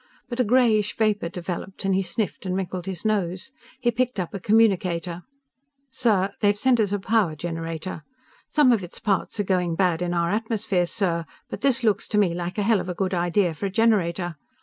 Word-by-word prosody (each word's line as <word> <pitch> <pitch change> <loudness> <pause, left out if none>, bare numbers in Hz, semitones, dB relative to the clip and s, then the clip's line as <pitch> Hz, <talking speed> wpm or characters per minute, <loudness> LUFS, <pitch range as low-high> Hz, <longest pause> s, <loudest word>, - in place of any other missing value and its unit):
But 240 0 -5
a - - +5
grayish 220 -3 +3
vapor 210 -5 +1
developed 180 +2 -5
and 195 - +2
he 190 - +2
sniffed 195 0 -2
and 185 - -1
wrinkled 185 -1 -4
his 190 +1 -5
nose. 195 0 -1 0.3
He 240 -2 +2
picked 245 -1 -1
up 180 - -3
a 200 - -4
communicator. 185 -5 +2 0.7
"_Sir, 205 -7 +1
they've 205 0 +3
sent 250 +2 +3
us 205 -3 +1
a 205 - +1
power 200 -4 +1
generator. 165 +1 -5 0.5
Some 295 -4 +4
of 220 -5 +2
its 175 - -9
parts 210 0 -1
are - - +2
going 180 -3 0
bad 180 -2 +1
in 175 0 -1
our 170 0 +1
atmosphere, 210 -4 0
sir, 170 -3 0 0.3
but - - -5
this 260 -1 +2
looks 210 -3 +1
to 210 - -1
me 195 -5 +3
like 175 +2 -4
a 205 - +1
hell 220 0 +3
of 180 - -5
a 180 - -3
good 190 +1 -1
idea 175 0 +1
for 200 +6 -3
a - - -6
generator! 185 -6 +1
195 Hz, 205 wpm, -24 LUFS, 175-215 Hz, 0.7 s, a